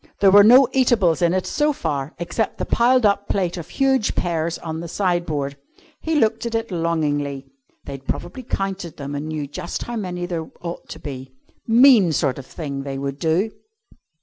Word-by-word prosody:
There 195 Hz, -1 st, +5 dB
were 205 Hz, +1 st, +8 dB
no 250 Hz, +5 st, +7 dB
eatables 225 Hz, -11 st, +2 dB
in 170 Hz, -1 st, +3 dB
it 185 Hz, 0 st, 0 dB
so 300 Hz, 0 st, +1 dB
far 145 Hz, -, -3 dB
except 175 Hz, +6 st, -2 dB
the -, -, -3 dB
piled 245 Hz, 0 st, +3 dB
up 200 Hz, 0 st, +2 dB
plate 180 Hz, -3 st, 0 dB
of 170 Hz, -2 st, -8 dB
huge 265 Hz, -4 st, +1 dB
pears 170 Hz, -1 st, -1 dB
on 160 Hz, -1 st, -5 dB
the 170 Hz, -, -6 dB
sideboard. 165 Hz, -7 st, -1 dB, 0.4 s
He 320 Hz, 0 st, -2 dB
looked 225 Hz, -5 st, +2 dB
at 230 Hz, -, -3 dB
it 225 Hz, -2 st, -2 dB
longingly. 145 Hz, -5 st, -1 dB, 0.4 s
They'd 135 Hz, -1 st, -8 dB
probably 260 Hz, -, -4 dB
counted 195 Hz, -7 st, -4 dB
them 140 Hz, 0 st, -6 dB
and 145 Hz, +2 st, -4 dB
knew 155 Hz, -2 st, -3 dB
just 145 Hz, +4 st, -5 dB
how 240 Hz, 0 st, -5 dB
many 180 Hz, -4 st, -4 dB
there 170 Hz, -3 st, -4 dB
ought 170 Hz, 0 st, -7 dB
to -, -, -7 dB
be. 130 Hz, -2 st, -8 dB, 0.3 s
Mean 230 Hz, -, +6 dB
sort 140 Hz, -2 st, 0 dB
of 135 Hz, -, -10 dB
thing 140 Hz, -4 st, -5 dB
they 135 Hz, -1 st, -5 dB
would 140 Hz, 0 st, -4 dB
do. 175 Hz, +7 st, +1 dB
175 Hz, 185 wpm, -21 LUFS, 145-220 Hz, 0.4 s, were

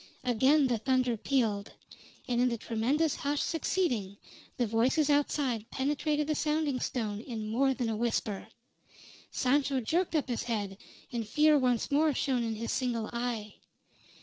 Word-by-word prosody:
Again 260 Hz, +5 st, +4 dB
the 240 Hz, -3 st, +1 dB
thunder 255 Hz, -1 st, +1 dB
pealed; 220 Hz, -4 st, 0 dB, 0.5 s
and 245 Hz, -1 st, +1 dB
in 250 Hz, -, +4 dB
the 235 Hz, -, -2 dB
tremendous 255 Hz, +8 st, 0 dB
hush 285 Hz, 0 st, -1 dB
succeeding, 250 Hz, -, -1 dB, 0.4 s
the 245 Hz, -, +2 dB
voices 250 Hz, +7 st, +2 dB
outside 270 Hz, -6 st, 0 dB
penetrated 295 Hz, +2 st, 0 dB
the 305 Hz, -, 0 dB
sounding 300 Hz, -3 st, 0 dB
stone 215 Hz, -6 st, -2 dB
in 220 Hz, -3 st, -5 dB
more 265 Hz, +3 st, +2 dB
than 245 Hz, -3 st, -2 dB
a 225 Hz, -, -1 dB
whisper. 220 Hz, -3 st, -2 dB, 0.8 s
Sancho 275 Hz, +1 st, +1 dB
jerked 335 Hz, +9 st, 0 dB
up 300 Hz, -, +1 dB
his 245 Hz, -2 st, -2 dB
head 205 Hz, -4 st, -3 dB, 0.3 s
and 230 Hz, -3 st, -3 dB
fear 300 Hz, +6 st, +4 dB
once 250 Hz, -4 st, +1 dB
more 300 Hz, 0 st, +3 dB
shone 260 Hz, -3 st, 0 dB
in 225 Hz, -1 st, -2 dB
his 230 Hz, +2 st, -4 dB
single 235 Hz, -4 st, -1 dB
eye. 235 Hz, -3 st, -3 dB
250 Hz, 150 wpm, -30 LUFS, 225-285 Hz, 0.8 s, Again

